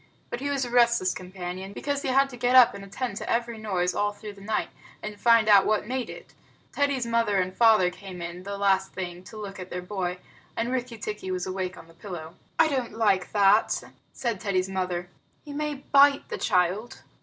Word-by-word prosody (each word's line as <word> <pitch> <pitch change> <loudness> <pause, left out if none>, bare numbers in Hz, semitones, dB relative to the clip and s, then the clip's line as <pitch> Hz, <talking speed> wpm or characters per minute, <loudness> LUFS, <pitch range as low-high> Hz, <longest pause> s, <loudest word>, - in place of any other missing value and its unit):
But 240 - -3
he 285 +2 -2
was 275 -2 0
a 240 - -7
restless 235 -6 +4
companion, 185 +1 -7
because 285 +5 -2
he - - -3
had 270 +1 +4
to - - -8
get 245 +1 +1
up 250 -2 +8
and 200 0 -8
attend 200 +2 -4
to - - -5
every 235 -1 -1
noise 180 -4 0
all 205 0 0
through 205 0 -9
the 200 - -15
night, 215 +2 -1 0.3
and 210 -1 -6
find 230 -2 +5
out 200 -2 +7
what 215 -1 +1
made 255 +2 -3
it. - - -11 0.4
Teddy's 280 -3 0
mother 230 -3 +1
and 185 0 -2
father 220 -6 +5
came 185 -1 -10
in, 175 +1 -6
the 200 +1 -5
last 195 -1 +2
thing, 180 -1 -6
to 215 - -11
look 200 -2 -7
at 185 0 -7
their 180 0 -5
boy, 180 -2 -3 0.4
and 235 +2 -1
Rikki 250 -2 -3
tikki 210 -2 -5
was 185 -1 -2
awake 185 -1 -3
on - - -12
the 165 - -18
pillow. 170 -2 -8 0.2
"I 325 - +6
don't 260 -7 -2
like 200 -5 +2
that," 205 +1 +4 0.3
said 235 -6 -3
Teddy's 185 -2 0
mother. 180 -2 -2 0.4
"He 290 - -8
may 300 0 -2
bite 280 +1 +4
the - - -4
child." 185 +6 0
205 Hz, 210 wpm, -26 LUFS, 185-240 Hz, 0.4 s, up